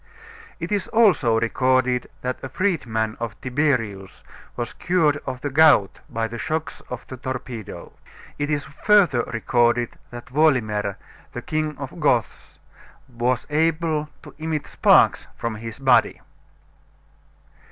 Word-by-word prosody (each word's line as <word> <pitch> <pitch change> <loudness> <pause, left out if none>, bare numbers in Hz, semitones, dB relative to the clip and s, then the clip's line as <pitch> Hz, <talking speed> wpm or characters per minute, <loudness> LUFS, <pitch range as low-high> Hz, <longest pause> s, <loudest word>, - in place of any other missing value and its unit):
It 170 +2 -5
is 205 -2 0
also 175 - +3
recorded 130 +1 +1
that 125 0 -3
a 135 - -5
freed 185 -6 -1
man 110 -1 -1
of 115 -2 -5
Tiberius 125 -8 -1 0.3
was 120 -1 -4
cured 160 -5 +1
of 125 - -4
the 145 - -3
gout 145 -9 +5
by 115 0 -2
the 120 +1 -7
shocks 160 +3 -3
of 125 - -6
the 130 - -9
torpedo. 125 -4 -7 0.5
It 145 0 -1
is 145 -1 0
further 175 - +3
recorded 120 +1 0
that 120 +1 -11
Wolimer, 110 -10 +2 0.4
the 125 - -6
King 155 -3 -2
of 140 -2 -6
the - - -13
Goths, 130 - -1 0.5
was 120 0 -1
able 155 0 +1
to - - -12
emit 155 -2 -2
sparks - - +4
from 115 -1 -3
his 115 0 -7
body. 130 -2 +3
130 Hz, 135 wpm, -23 LUFS, 120-155 Hz, 0.5 s, gout